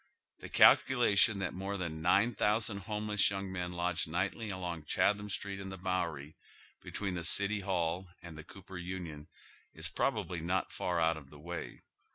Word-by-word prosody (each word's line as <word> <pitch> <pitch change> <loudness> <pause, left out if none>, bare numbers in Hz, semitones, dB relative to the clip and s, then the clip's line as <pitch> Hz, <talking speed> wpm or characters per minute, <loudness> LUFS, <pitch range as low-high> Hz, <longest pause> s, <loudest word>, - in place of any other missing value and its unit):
The - - -9
calculation 110 -4 +6
that 95 -2 -2
more 95 +2 -3
than 80 -4 -4
nine 100 +8 +3
thou 105 +1 +2
sand 100 -3 -1
homeless 105 0 +1
young 95 -1 -4
men 90 -1 -3
lodge 90 -1 -1
nightly 95 +7 -2
along 90 -5 -4
Chatham 105 +6 +1
Street 100 -1 -3
and 95 0 -6
the 95 - -7
Bowery, 85 -5 -2 0.5
between 100 -3 -3
the 85 -1 -4
City 100 +5 +3
Hail 90 -2 -1 0.2
and 85 -2 -9
the 80 - -9
Cooper 95 0 -10
Union, 85 -5 -6 0.5
is 80 +1 -5
probably 95 -4 -1
not 90 +3 -1
far 90 -1 -1
out 80 0 +2
of 70 -3 -12
the 75 - -13
way. 85 +3 -7
95 Hz, 175 wpm, -33 LUFS, 85-100 Hz, 0.5 s, calculation